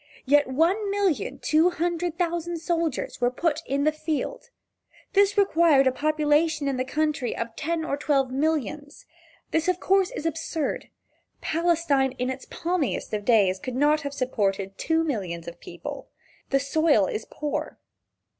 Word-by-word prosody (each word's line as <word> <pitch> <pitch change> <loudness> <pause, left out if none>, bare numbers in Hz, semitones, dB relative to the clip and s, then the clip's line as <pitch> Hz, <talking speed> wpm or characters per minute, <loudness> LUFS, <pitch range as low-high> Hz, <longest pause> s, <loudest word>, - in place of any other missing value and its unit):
Yet 290 +1 +4
one 345 +10 +1
million 390 - 0
two 315 +3 +3
hundred 345 -1 -2
thousand 345 -1 -1
soldiers 330 -6 -2
were 245 - +4
put 310 +4 -1
in 280 +1 0
the 310 - +3
field. 310 - -4 0.6
This 400 0 +4
required 330 -8 +4
a 260 - +4
population 305 +1 +1
in 270 -2 0
the 255 - 0
country 295 -2 -1
of 230 -1 -4
ten 320 +1 -2
or 280 - -1
twelve 275 -3 +1
millions. 295 0 -2 0.5
Of 355 +3 +1
course 385 -1 +3
this - - -8
is 300 - -5
absurd. 325 -1 -2 0.5
Palestine 320 -5 +1
in 255 0 -2
its 260 0 -8
palmiest 340 -5 -2
days 200 -6 +4
could 255 +4 -5
not 295 +3 +3
have 280 -1 -5
supported 195 -7 -1
two 325 0 +1
millions 185 - -3
of 170 0 -8
people. 175 -1 -8 0.4
The 275 - +3
soil 280 -5 +3
is 215 - -4
poor. 300 -1 -4
300 Hz, 150 wpm, -25 LUFS, 260-330 Hz, 0.6 s, Yet